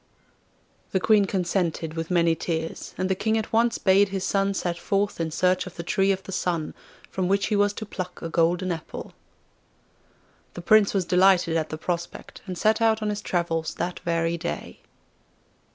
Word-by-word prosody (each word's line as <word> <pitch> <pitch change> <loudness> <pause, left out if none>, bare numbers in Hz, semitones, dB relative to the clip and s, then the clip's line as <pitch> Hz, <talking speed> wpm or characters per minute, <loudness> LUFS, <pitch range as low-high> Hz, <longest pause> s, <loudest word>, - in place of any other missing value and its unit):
The 190 - +3
Queen 210 +1 +4
consented 175 -4 -1
with 165 0 -4
many 170 -2 +3
tears, 160 0 -4
and 185 - 0
the 190 - +2
King 220 +4 0
at 220 0 -4
once 230 +1 +3
bade 195 +1 +4
his 195 -1 -3
son 195 0 +1
set 175 -2 -2
forth 200 -2 -1
in 165 - -1
search 185 +3 +1
of 180 - -10
the 170 - -5
Tree 195 +3 +2
of 190 0 -2
the - - -8
Sun, 170 -4 -2 0.4
from 185 -1 -1
which 200 +1 +2
he 215 - +1
was 205 0 +3
to 215 - -6
pluck 185 -3 -6
a - - -5
golden 170 +2 +1
apple. 165 -2 -6 1.4
The 175 - -6
Prince 215 +1 +5
was 190 -2 +1
delighted 180 -2 +4
at 160 -1 0
the 155 - -5
prospect, 170 +1 -5
and 180 -1 -5
set 220 +3 +2
out 220 -1 +3
on 210 - 0
his 205 0 -4
travels 165 -4 -1
that 180 0 -3
very 165 0 -1
day. 170 - -5
185 Hz, 185 wpm, -25 LUFS, 170-200 Hz, 1.4 s, Prince